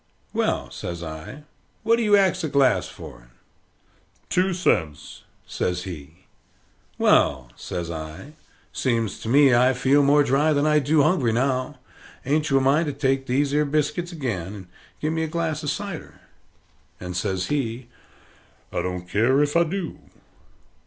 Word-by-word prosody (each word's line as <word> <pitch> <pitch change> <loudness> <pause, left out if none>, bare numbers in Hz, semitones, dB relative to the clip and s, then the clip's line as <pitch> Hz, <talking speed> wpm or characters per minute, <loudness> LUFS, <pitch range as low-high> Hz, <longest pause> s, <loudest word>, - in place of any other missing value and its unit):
"Well," - - -1
says 85 -1 -6
I, 80 - -8 0.4
"what 230 +1 +3
do - - -1
you 210 -2 +4
ax 190 -2 +2
a 160 - -1
glass 135 -2 +2
for - - -11
it?" - - -22 1.0
"Two 185 +1 +2
cents," 80 - -1 0.2
says 90 0 -2
he. 85 0 -10 0.7
"Well," 65 -3 +2
says 85 -2 -5
I, 80 - -8 0.4
"seems 115 -6 -1
to 110 - -6
me 140 0 +5
I 125 +2 +4
feel 135 +3 +3
more 145 +1 +4
dry 145 +3 +2
than 145 0 +1
I 150 0 +4
do 145 +1 +3
hungry 150 -8 +2
now. 130 +3 -1 0.5
Ain't 150 +3 +1
you 135 - +3
a - - +3
mind 145 +5 +2
to 145 - -2
take 135 -1 0
these 140 +3 +1
'ere 150 +1 +3
biscuits 155 +4 -1
again, 105 - -4
and 95 -3 -10 0.3
give 155 +1 -1
me 160 - -1
a 160 - -1
glass 160 -1 -2
of 150 - -3
cider?" 195 0 -6 0.8
And 90 0 -6
says 95 0 -2
he, 125 -4 -2 0.9
"I - - 0
don't 90 -1 -4
care 125 +9 +3
if 145 +1 -2
I 170 - +5
do." 175 0 -4
135 Hz, 160 wpm, -23 LUFS, 95-155 Hz, 1.0 s, me